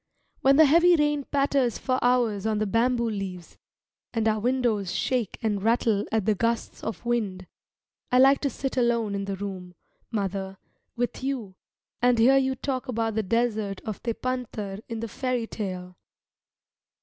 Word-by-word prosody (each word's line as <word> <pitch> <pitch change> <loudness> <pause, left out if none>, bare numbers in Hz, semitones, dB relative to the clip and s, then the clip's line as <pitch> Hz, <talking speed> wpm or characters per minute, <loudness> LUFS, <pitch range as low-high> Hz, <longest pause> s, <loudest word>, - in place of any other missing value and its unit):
When 270 +1 +5
the 315 +2 +8
heavy 340 +4 +6
rain 295 -2 +1
patters 275 -4 +1
for 255 -1 -1
hours 235 -5 +2
on 215 -1 +1
the 215 - 0
bamboo 235 +3 +1
leaves, 195 -5 -6 0.6
and 225 -1 +1
our 215 0 +2
windows 230 -5 0
shake 245 -6 -1
and 210 -3 0
rattle 225 -1 +2
at 220 -3 +1
the 215 - +3
gusts 230 +3 -2
of 225 +2 -5
wind, 210 -6 -1 0.7
I 250 - +4
like 270 +2 +6
to 280 - +1
sit 270 0 -4
alone 235 -4 +1
in 200 0 -2
the 195 0 -3
room, 185 -2 -7 0.3
mother, 195 -2 -3 0.4
with 245 +1 -3
you, 255 -8 -3 0.5
and 245 0 +4
hear 255 +4 +6
you 265 -1 +1
talk 260 0 -3
about 225 -2 -1
the 220 - +1
desert 215 -2 0
of 215 -3 -6
Tepântar 230 -4 -3
in 230 -1 -4
the 230 - -3
fairy 250 +1 -2
tale. 185 -5 -6
230 Hz, 160 wpm, -26 LUFS, 205-255 Hz, 0.7 s, the